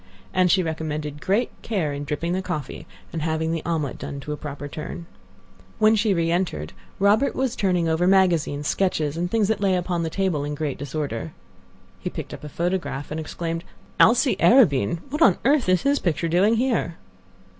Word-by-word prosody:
And 185 -1 +3
she 185 +1 +4
recommended 155 -2 -4
great 210 +6 +1
care 180 -10 -1
in 145 0 -5
dripping 165 +4 -2
the 185 - 0
coffee 165 -3 -5 0.3
and 165 - -3
having 160 0 -1
the 165 -1 -2
omelet 155 -5 -2
done 140 - -6
to 150 - -6
a - - -3
proper 145 -1 -7
turn. 155 +3 -7 0.7
When 215 0 +5
she 215 0 +2
reentered, 170 0 0 0.2
Robert 205 +7 +3
was 260 -2 -1
turning 180 -4 +1
over 165 +2 +2
magazines, 170 -6 +2
sketches, 160 -6 0
and 175 +1 -2
things 220 0 +2
that 220 -1 0
lay 195 -2 +3
upon 175 -1 -1
the 165 - -1
table 180 -5 -1
in 145 0 -3
great 145 -2 -3
disorder. 140 - -4 0.7
He - - -4
picked - - -7
up - - -9
a 150 - -6
photograph, 170 -4 -2
and 155 - -3
exclaimed: 165 +1 -4 0.4
"Alcée 245 +3 +5
Arobin! 170 - +4
What 300 +3 -3
on - - +6
earth 275 -7 +3
is 185 -1 +3
his 280 +1 +2
picture 170 -1 0
doing 190 +7 +3
here?" 230 -9 0
170 Hz, 185 wpm, -24 LUFS, 150-195 Hz, 0.7 s, on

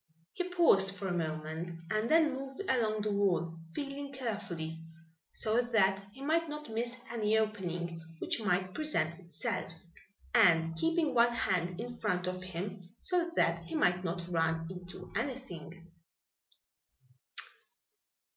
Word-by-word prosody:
He 360 0 -2
paused 195 - +5
for 195 - -4
a - - -1
moment 160 +1 -3
and 215 +2 +1
then 315 -2 +5
moved 270 0 -6
along 220 -4 +2
the 210 - 0
wall, 175 -5 +1 0.2
feeling 280 0 -4
carefully, 200 -11 -4 0.5
so 220 +3 +2
that 195 -5 +3
he 265 +5 -10
might 325 +2 +2
not 300 -4 -6
miss 235 +2 -1
any 220 -2 +2
opening 175 -6 -1 0.2
which 225 - -1
might 185 -2 +1
present 190 - 0
itself, 190 +6 -3 0.6
and 165 -7 +5
keeping 325 - +2
one 240 0 +5
hand 180 -5 0
in 240 +1 -6
front 180 0 0
of 185 0 -3
him, 185 +1 -6
so 350 -2 +1
that - - +2
he - - -5
might 180 - +3
not 175 0 -3
run 165 -1 +1
into 185 0 -8
anything. 180 - -5
200 Hz, 135 wpm, -33 LUFS, 175-245 Hz, 0.6 s, paused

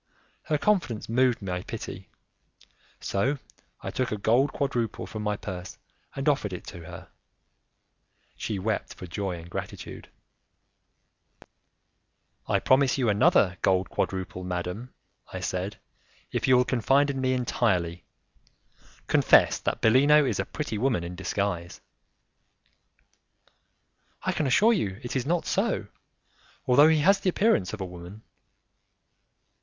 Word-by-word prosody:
Her 150 - +1
confidence 170 - 0
moved 125 -1 +2
my 90 -2 -3
pity, - - -7 0.9
so 130 +9 0 0.5
I - - -4
took 130 - -2
a 105 - -1
gold 120 +7 +2
quadruple 120 -6 -2
from 110 - -6
my 105 -1 -1
purse 95 -3 -7 0.4
and 135 +2 -3
offered 135 -10 +1
it 90 - -7
to 85 -2 -10
her; - - -10 1.3
she 105 - -3
wept 105 +3 -2
for - - -9
joy 95 0 -3
and 85 0 -10
gratitude. 85 - -7 2.4
"I - - +2
promise 130 0 +3
you 125 -4 +1
another 100 -2 +3
gold 95 0 +2
quadruple, 95 -1 -3
madam," 90 +7 -4 0.4
I - - -5
said, 95 +3 -3 0.5
"if - - -1
you 130 -1 +6
will 125 - +3
confide 135 +4 +2
in 135 -1 -4
me 130 0 +1
entirely. 90 -9 0 1.0
Confess - - +4
that - - -2
Bellino 145 +6 +5
is 115 -7 -1
a 95 - 0
pretty 140 -8 -4
woman 120 -8 +1
in 85 +1 -6
disguise." 90 -2 -3 2.4
"I - - +1
can 150 - -1
assure 215 - +5
you 100 - -2
it 120 - -5
is 130 0 -1
not 170 +1 0
so, - - 0 0.8
although 140 +4 +6
he 160 -2 +3
has 195 +5 +5
the 195 - +1
appearance 185 - +2
of 110 - -6
a - - -2
woman." 90 +4 -10
110 Hz, 135 wpm, -27 LUFS, 95-135 Hz, 2.4 s, you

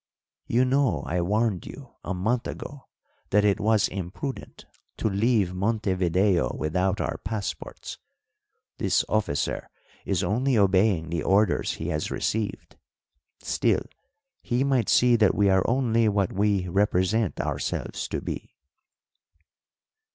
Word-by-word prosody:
"You 125 +2 +3
know 130 - +1
I 90 +1 -1
warned 105 0 0
you - - -11
a 95 - -3
month 115 +7 0
ago 145 -2 -8 0.4
that 105 +1 +3
it 100 -2 +2
was 110 -1 +3
imprudent 100 - -6 0.3
to - - 0
leave 105 -2 +1
Montevideo 95 -2 +1
without 90 +5 0
our - - -2
passports. 95 -7 -5 0.8
This - - +2
officer 105 -10 -1 0.3
is 95 -1 -1
only 120 +7 +1
obeying 95 -4 +2
the 85 -2 -1
orders 100 +2 +2
he - - -5
has 75 0 -2
received; 110 -2 -3 0.6
still, - - 0 0.6
he 125 +2 0
might 130 -5 +1
see 125 -1 +5
that 105 -3 +3
we 100 -1 +3
are 95 0 +4
only 115 -3 +2
what 100 -3 0
we 100 -2 +1
represent 100 +2 +1
ourselves - - -3
to - - -3
be." - - -6
100 Hz, 125 wpm, -26 LUFS, 95-115 Hz, 0.8 s, see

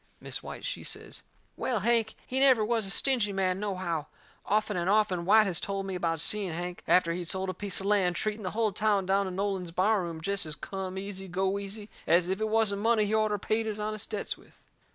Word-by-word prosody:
Mis' - - -6
White, - - -8
she - - -4
says: - - -6 0.3
"Well, 240 -6 -1
Hank 230 0 +2
he 260 - -1
never 260 -5 +5
was 225 -2 0
a - - -2
stingy 235 -1 +1
man, 190 -1 0
nohow. 185 -7 -2 0.4
Often 210 -1 +1
and 175 +1 0
often 200 -4 +2
White 215 +3 +6
has 180 -3 0
told 195 -1 -3
me 195 - -4
about 165 -3 -1
seeing 200 -2 +2
Hank, 175 +2 -5
after 170 -2 +4
he'd 175 0 -4
sold 190 +2 -1
a - - -8
piece 200 -1 -2
of 195 - -6
land, 195 -4 +3
treating 215 +3 -2
the 185 - -2
hull 220 -2 +2
town 205 -1 +1
down 195 +1 +2
in 185 - -5
Nolan's 195 -2 -1
bar 195 +5 +2
room 170 -2 -5
jest 200 +1 0
as 155 - -4
come 190 +2 -5
easy, 195 0 -6
go 190 +2 0
easy 200 +1 -7 0.2
as 170 +2 +4
if 190 +3 -1
it 220 - 0
wasn't 215 -2 +2
money 225 -1 +3
he 205 - -2
orter 215 -1 +2
paid 220 +3 -1
his 215 -1 -2
honest 215 0 -3
debts 210 - -3
with." - - -22
200 Hz, 230 wpm, -29 LUFS, 185-215 Hz, 0.4 s, White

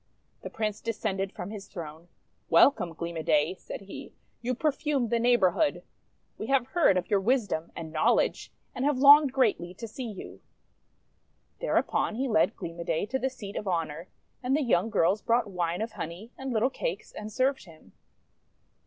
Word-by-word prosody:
The - - -6
Prince 215 -1 -3
descended 195 -4 -2
from 180 +3 -7
his 205 -2 -8
throne. 165 -2 -9 0.2
" - - -44
Wel - - +7
come, 180 -10 -6
Gleam 170 0 -5
o' - - -2
Day," 155 +2 +2
said 190 - -9
he. 195 0 -10 0.3
'You 250 +2 -1
perfume 285 -3 0
the 235 - +1
neighbourhood! 240 - +2 0.6
We 215 - -4
have 270 -2 +2
heard 280 - +4
of 180 - -2
your 200 - +4
wisdom 200 -7 0
and 160 -1 -7
knowledge, 155 - +1 0.2
and 250 - -3
have 290 -1 +2
longed 285 +1 +8
greatly 205 -9 +1
to 230 +4 -7
see 235 +2 -6
you." 205 - -9 1.2
Thereupon - - 0
he 265 +3 -1
led 215 -1 +2
Gleam 170 -2 -7
o' - - -3
Day 165 +2 -1
to 265 +5 -2
the 265 - 0
seat 210 -6 -9
of 210 - -4
honour, 165 -1 -2 0.3
and 260 +2 +1
the 305 - 0
young 225 -4 +2
girls 200 -1 +2
brought 230 -3 +1
wine 175 +2 -1
of 225 - -5
honey 180 +6 -7
and 265 0 -5
little 240 +3 +1
cakes, - - -4
and 215 0 -7
served 265 +2 0
him. 160 - -17
215 Hz, 185 wpm, -28 LUFS, 175-255 Hz, 1.2 s, longed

